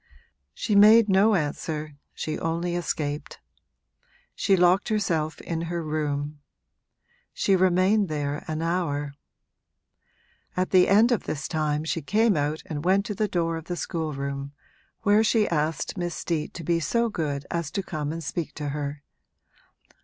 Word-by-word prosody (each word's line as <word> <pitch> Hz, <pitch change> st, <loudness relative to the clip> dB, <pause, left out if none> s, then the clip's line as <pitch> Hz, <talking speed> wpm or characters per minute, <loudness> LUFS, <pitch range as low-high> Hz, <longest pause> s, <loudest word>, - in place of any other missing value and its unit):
She 215 Hz, -, -2 dB
made 215 Hz, +2 st, +7 dB
no 200 Hz, +3 st, +5 dB
answer, 150 Hz, -1 st, -3 dB, 0.2 s
she 155 Hz, -, -3 dB
only 170 Hz, +2 st, -1 dB
escaped. 150 Hz, -3 st, -3 dB, 0.9 s
She 195 Hz, -2 st, +2 dB
locked 180 Hz, +2 st, +3 dB
herself 165 Hz, -8 st, 0 dB
in 165 Hz, -1 st, -3 dB
her 170 Hz, -1 st, -2 dB
room; 150 Hz, -1 st, -2 dB, 0.9 s
she 195 Hz, -, +2 dB
remained 185 Hz, +2 st, +3 dB
there 145 Hz, -1 st, -2 dB
an 155 Hz, 0 st, -3 dB
hour. 145 Hz, -5 st, -1 dB, 1.4 s
At 185 Hz, 0 st, 0 dB
the 185 Hz, -1 st, +6 dB
end 215 Hz, +5 st, +5 dB
of 240 Hz, -, 0 dB
this 150 Hz, -, -3 dB
time 155 Hz, -2 st, -1 dB
she 160 Hz, +1 st, -2 dB
came 215 Hz, +6 st, +2 dB
out 150 Hz, +1 st, -1 dB
and 145 Hz, -1 st, -5 dB
went 195 Hz, +3 st, +3 dB
to 210 Hz, -, -3 dB
the 210 Hz, +2 st, 0 dB
door 165 Hz, -3 st, -1 dB
of 160 Hz, -, -8 dB
the 175 Hz, -, -3 dB
schoolroom, 140 Hz, -5 st, -4 dB, 0.5 s
where 210 Hz, +1 st, +5 dB
she 220 Hz, -1 st, +3 dB
asked 155 Hz, +3 st, -1 dB
Miss 175 Hz, -1 st, -2 dB
Steet 160 Hz, -3 st, -3 dB
to 170 Hz, -, -6 dB
be 170 Hz, +2 st, +1 dB
so 235 Hz, +9 st, +1 dB
good 145 Hz, -9 st, -3 dB
as 170 Hz, -3 st, -2 dB
to 195 Hz, -, -3 dB
come 150 Hz, -4 st, -4 dB
and 165 Hz, +1 st, -5 dB
speak 160 Hz, +3 st, -4 dB
to 145 Hz, -1 st, -4 dB
her. 145 Hz, 0 st, -4 dB
165 Hz, 155 wpm, -26 LUFS, 150-190 Hz, 1.4 s, made